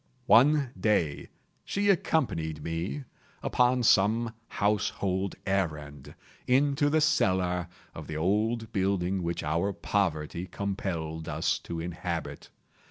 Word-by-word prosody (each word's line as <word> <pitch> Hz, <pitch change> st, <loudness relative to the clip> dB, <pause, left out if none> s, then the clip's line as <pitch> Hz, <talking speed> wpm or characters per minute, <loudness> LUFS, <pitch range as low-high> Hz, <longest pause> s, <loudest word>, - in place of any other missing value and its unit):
One 140 Hz, +2 st, +5 dB
day 85 Hz, -9 st, +1 dB, 0.3 s
she 200 Hz, 0 st, +2 dB
accompanied 80 Hz, -, 0 dB
me, 85 Hz, -, -3 dB, 0.4 s
upon 125 Hz, 0 st, +2 dB
some 110 Hz, +2 st, +3 dB
household 100 Hz, -2 st, 0 dB
errand, 75 Hz, -8 st, -3 dB, 0.3 s
into 140 Hz, +3 st, +3 dB
the 155 Hz, +1 st, +2 dB
cellar 95 Hz, -, +2 dB, 0.3 s
of 80 Hz, -3 st, -8 dB
the 80 Hz, -, -4 dB
old 110 Hz, +6 st, 0 dB
building 95 Hz, -1 st, 0 dB
which 85 Hz, 0 st, -2 dB
our 85 Hz, +7 st, 0 dB
poverty 85 Hz, -4 st, -1 dB
compelled 85 Hz, -6 st, -4 dB
us -, -, 0 dB
to 85 Hz, -1 st, -3 dB
inhabit. 85 Hz, 0 st, -5 dB
95 Hz, 105 wpm, -28 LUFS, 85-115 Hz, 0.4 s, One